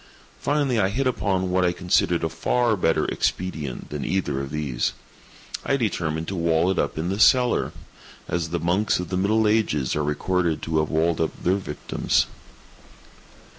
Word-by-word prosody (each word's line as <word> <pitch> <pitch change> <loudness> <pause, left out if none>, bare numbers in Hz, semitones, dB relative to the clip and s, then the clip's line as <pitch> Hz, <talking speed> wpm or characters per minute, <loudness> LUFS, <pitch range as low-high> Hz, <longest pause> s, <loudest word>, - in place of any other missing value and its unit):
Finally 140 -5 +1
I 95 -2 +2
hit 130 +7 -1
upon 95 -7 0
what 90 0 +2
I 90 - +3
considered 90 -1 +1
a 80 - +1
far 115 +8 +1
better 80 -4 +1
expedient 80 -8 -3
than 75 -2 -4
either 75 -7 -1
of 70 - -5
these. 70 -5 -1 0.7
I 140 - +1
determined 80 - -2
to 95 - -3
wall 85 +1 +2
it 95 - -1
up - - -1
in 80 +3 -2
the 100 +2 -2
cellar—as 110 - +1
the 85 +1 -2
monks 90 +6 +1
of 90 - -4
the 90 - -1
middle 110 +3 +2
ages 105 - +1
are 75 - 0
recorded 85 +3 0
to 80 -1 0
have 75 - 0
walled 80 +1 +1
up 80 - -3
their 95 +2 +2
victims. 95 - -1
90 Hz, 170 wpm, -24 LUFS, 80-100 Hz, 0.7 s, I